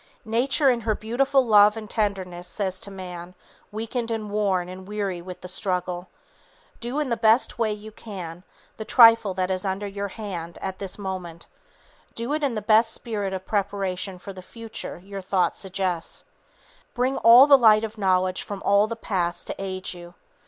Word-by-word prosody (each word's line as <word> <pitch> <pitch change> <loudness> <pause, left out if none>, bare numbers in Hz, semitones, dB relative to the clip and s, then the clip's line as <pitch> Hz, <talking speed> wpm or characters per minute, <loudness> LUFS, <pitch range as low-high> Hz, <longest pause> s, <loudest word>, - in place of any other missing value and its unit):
Nature 260 +5 +2
in 240 -1 -1
her 220 -1 0
beautiful 260 +5 +1
love 210 -1 +6
and 215 -1 -7
tenderness, 190 -5 -2
says 190 -3 -3
to 200 - -7
man, 180 -2 -8 0.4
weakened 230 +2 -3
and 215 -2 -3
worn 195 -4 0
and 185 +1 -9
weary 200 -4 -3
with 180 +1 -9
the 180 - -8
struggle, 180 -1 -2 0.7
"Do 245 +5 -3
in 295 -3 -1
the 235 - +1
best 225 +2 +3
way 225 -2 +1
you 210 +1 -7
can 180 -6 -8 0.3
the 220 - -5
trifle 225 -4 +6
that 185 0 -1
is 185 -1 -1
under 195 +1 -2
your 200 0 -4
hand 180 -5 -6
at 190 -1 -5
this 195 -2 -5
moment; 185 -4 -6 0.7
do 235 +5 -3
it 310 - -1
in 270 -5 0
the 215 - -3
best 225 +1 +4
spirit 210 -5 -3
of 190 0 -5
preparation 195 -2 -2
for 195 +2 -9
the 185 - -10
future 225 +3 -7
your 200 0 -6
thought 185 -1 +1
suggests; 185 -3 -3 0.7
bring 255 +2 0
all 235 +4 +8
the 285 -1 +8
light 220 -4 +6
of 220 0 -6
knowledge 185 -1 +1
from 200 -2 -7
all 200 +1 +4
the 230 - -4
past 180 -6 -2
to - - -5
aid 185 -1 -3
you. 175 0 -12
200 Hz, 180 wpm, -24 LUFS, 185-225 Hz, 0.7 s, all